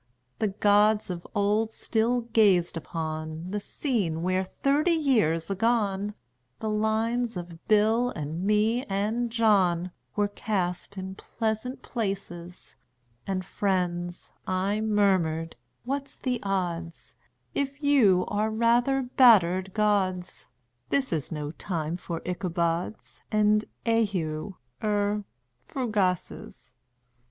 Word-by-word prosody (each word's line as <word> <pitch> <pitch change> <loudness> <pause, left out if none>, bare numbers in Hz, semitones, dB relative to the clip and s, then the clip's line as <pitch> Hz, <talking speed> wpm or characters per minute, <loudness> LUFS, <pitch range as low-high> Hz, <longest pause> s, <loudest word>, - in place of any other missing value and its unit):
The 215 - +2
gods 205 +1 +3
of 175 -1 -6
old 210 +2 +2
still 230 +2 0
gazed 210 -7 +3
upon 160 +2 -5
The 210 - -1
scene 200 - -2
where, 185 +1 +1
thirty 285 - +1
years 215 - +2
agone, 205 -1 0 0.4
The 220 - -2
lines 220 +1 0
of 170 -1 -8
Bill 220 +3 +3
and 160 -3 -4
me 215 +4 +2
and 215 +5 -1
John 190 -6 +2 0.2
Were 205 -1 +2
cast 195 -2 -3
in 190 0 -5
pleasant 220 +5 -3
places; 190 -6 -5 0.5
And 185 -1 -2
"Friends," 175 -3 -2 0.2
I 195 +3 0
murmured, 190 -7 +1 0.3
"what's 275 +2 -4
the 250 -2 -1
odds 175 -4 -3 0.4
If 280 +1 -3
you 230 -11 +5
are 210 +1 0
rather 240 +4 +2
battered 195 -8 +5
gods? 190 -3 0 0.4
This 270 -8 +1
is 155 -5 -2
no 150 -2 -4
time 165 -2 -3
for 170 -2 -5
Ichabods 170 - -2
And 215 0 +3 0.2
eheu 195 -7 0 0.3
er 205 -1 0 0.4
fugaces." 200 - -2
205 Hz, 110 wpm, -27 LUFS, 175-225 Hz, 0.5 s, you